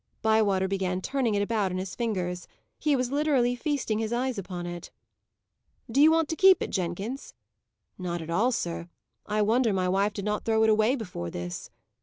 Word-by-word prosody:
Bywater 210 -4 +3
began 190 -1 -1
turning 240 +1 0
it 200 - +2
about 205 -3 0
in 180 - -2
his 185 0 -4
fingers; 180 -7 -2 0.3
he 295 -2 +2
was 250 -1 -1
literally 275 -4 +2
feasting 260 -5 -1
his 220 0 -2
eyes 245 -1 -1
upon 180 -2 -6
it. 175 0 -6 1.0
"Do 275 - +3
you 310 - +8
want 325 -1 +3
to 320 - -1
keep 380 +2 +6
it, - - -5
Jenkins?" 195 +8 -4 0.6
"Not 175 -1 -3
at 165 0 -6
all, 225 +9 +2
sir. 170 -6 -3 0.4
I 210 0 +1
wonder 230 +2 +3
my 185 -1 0
wife 195 +3 +1
did 200 -1 -5
not 210 0 -1
throw 220 -1 +2
it 220 - +5
away 215 +4 +3
before 180 - -5
this." 90 +1 -6
210 Hz, 190 wpm, -27 LUFS, 185-245 Hz, 1.0 s, you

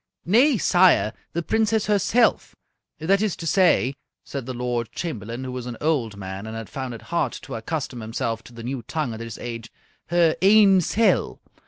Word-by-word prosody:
"Nay, 245 - +4
sire, 175 - +4 0.2
the 170 +1 -2
Princess 220 +2 +1
herself 210 +3 +2 0.4
that 195 +5 +2
is 215 -4 0
to 165 - -8
say," 160 - +3 0.3
said 135 -3 -6
the 130 - -4
Lord 120 -2 -2
Chamberlain, 120 - -5
who 130 - -5
was 125 -1 -6
an 120 -2 -6
old 130 -10 0
man 95 +1 -6
and 110 0 -6
had 115 -4 -8
found 130 -3 -5
it 115 - -11
hard 170 - +1
to 135 - -9
accustom 125 +2 -4
himself 115 0 -3
to 120 - -14
the 115 - -9
new 130 +1 -4
tongue 150 -2 -3
at 110 - -7
his 115 -2 -7
age, 115 -1 -7 0.4
"her 170 -2 +3
ain 195 -1 +6
sel'! 225 +6 +1
135 Hz, 185 wpm, -23 LUFS, 115-185 Hz, 0.4 s, ain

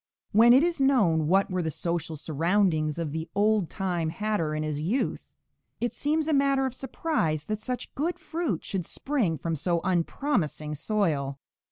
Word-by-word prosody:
When 230 +3 +7
it 260 +5 +7
is 340 -4 0
known 195 - +3
what 195 +3 +3
were 185 -1 0
the 160 - -1
social 165 0 -3
surroundings 160 0 +1
of 165 -3 -3
the 160 +2 -4
"old 210 -3 +2
time" 175 -4 -1
hatter 165 -3 -1
in 155 - -1
his 150 -1 -2
youth, 210 - -2 0.4
it 240 - -1
seems 305 +1 0
a 315 - +2
matter 275 -1 +3
of 260 - -2
surprise 255 - -1
that 215 0 -3
such 250 +2 -5
good 330 +5 -1
fruit 320 - -3
should 185 -4 -3
spring 235 - -1
from 165 +3 -2
so 170 +3 0
unpromising 175 - 0
soil. 150 -5 -1
185 Hz, 170 wpm, -27 LUFS, 160-255 Hz, 0.4 s, When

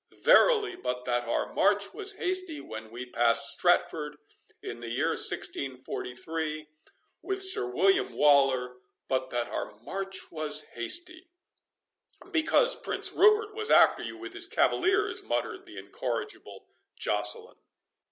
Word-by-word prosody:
Verily 425 -6 +5
but 125 - -4
that 120 -1 -1
our 115 - -2
march 200 0 +1
was 410 -1 -5
hasty 370 -5 -3
when 110 0 -9
we 120 +3 -7
passed 115 -1 +4
Stratford, 155 -4 0 0.5
in - - -7
the 120 -1 -7
year 115 - 0
1643, 150 +4 -1 0.5
with 390 0 -2
Sir 375 - +3
William 195 +10 +2
Waller; 135 -4 +3 0.3
but 130 -1 -1
that 120 -1 -2
our - - -5
march 195 +3 -6
was 150 -1 -2
hasty"— 340 - -5 1.0
"Because 390 +9 +3
Prince - - +2
Rupert 425 +1 +4
was 435 +1 -3
after - - +5
you - - -7
with - - -9
his - - +1
cavaliers," 400 +4 +1
muttered - - -4
the - - -12
incorrigible 400 -1 -6 0.3
Joceline. 460 -1 -1
165 Hz, 125 wpm, -28 LUFS, -, 1.0 s, Verily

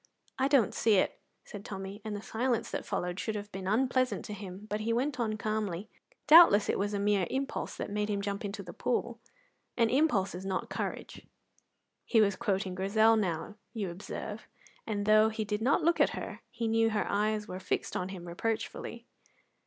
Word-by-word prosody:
"I 265 - +3
don't 275 -7 +3
see 220 -2 +3
it," 185 - +1 0.3
said 205 -1 -9
Tommy, 195 0 -7
and 215 -1 -4
the 205 - -6
silence 235 0 -1
that - - -4
followed 180 +1 -2
should 220 - -2
have 205 0 -6
been 190 0 -6
unpleasant 255 +4 +1
to 210 - -6
him; 195 0 -8
but 210 0 -2
he 220 +2 -1
went 255 +3 0
on 215 -2 0
calmly: 215 -2 -3 0.3
"Doubtless 300 -10 +8
it - - +1
was 205 +1 -1
a - - -1
mere 200 -2 +2
impulse 270 +1 -3
that - - -4
made 210 +1 -1
him 205 -1 0
jump 200 +2 -3
into 200 0 -5
the 175 - -9
pool, 240 -1 -1 0.6
and 230 -2 +3
impulse 245 -9 +2
is 180 +2 -6
not 190 -1 -3
courage." - - -5 0.8
He 230 - +3
was 200 -2 +4
quoting 195 -4 -1
Grizel 215 +4 +4
now, 200 0 -2 0.2
you 200 -5 -2
observe, 210 +4 -7 0.4
and 205 -2 -2
though 215 +1 +6
he 220 0 -3
did 210 +1 -2
not 275 +8 +2
look 340 +1 +3
at - - +2
her, - - -6
he 230 - -3
knew 225 0 +3
her 215 -1 0
eyes 210 +1 0
were 185 - -6
fixed - - -2
on 180 +1 -2
him 180 -2 -8
reproachfully. 225 +5 -3
210 Hz, 195 wpm, -31 LUFS, 200-225 Hz, 0.8 s, Doubtless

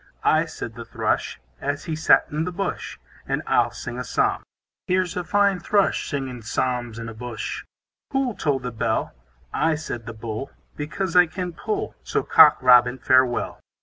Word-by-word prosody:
I, - - +4
said - - -7
the - - -8
Thrush, - - -2 0.2
As 145 +1 -3
he 160 -3 -2
sat 155 - +5
in 155 +2 -1
the 180 - -3
bush; 195 +3 -4 0.3
And - - -1
I'll - - +3
sing - - -7
a - - -2
psalm. - - 0 0.5
Here's 185 -1 +1
a 180 - -2
fine 200 +2 +2
Thrush, 200 +3 +1
Singing 135 -4 -4
psalms 120 0 -2
in 115 -1 -6
a 115 - -6
bush. 120 0 -5 0.5
Who'll 270 -3 0
toll 145 -8 0
the 125 -1 -5
bell? 110 0 -1 0.4
I, 160 -1 +2
said 125 -6 -6
the 115 - -5
Bull, 110 +4 -5 0.3
Because 170 +5 -3
I 180 -1 +7
can 180 +1 -5
pull; 415 - -3
So - - -1
Cock 435 -2 +7
Robin, 125 0 +6
farewell. 130 -1 +2
145 Hz, 175 wpm, -23 LUFS, 125-180 Hz, 0.5 s, I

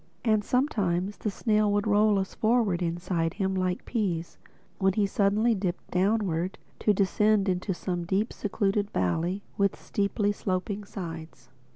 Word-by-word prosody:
And 215 -2 +3
sometimes 205 - 0
the 215 - -2
snail 210 0 +1
would 205 0 +1
roll 210 0 +4
us 190 -1 -2
forward 220 -6 +2
inside 170 -1 -1
him 190 -1 0
like 185 -1 -1
peas, 180 -8 -2 0.4
when 190 -2 +3
he 205 +1 +2
suddenly 205 +4 +2
dipped 185 -3 -3
downward 185 -2 +1 0.2
to 210 - +3
descend 205 +1 +2
into 185 +1 0
some 175 -1 -3
deep 200 +5 0
secluded 200 0 -1
valley 170 - -1 0.2
with 200 -1 +1
steeply 205 0 0
sloping 200 +1 -3
sides. 165 -9 -8
195 Hz, 145 wpm, -27 LUFS, 180-210 Hz, 0.4 s, roll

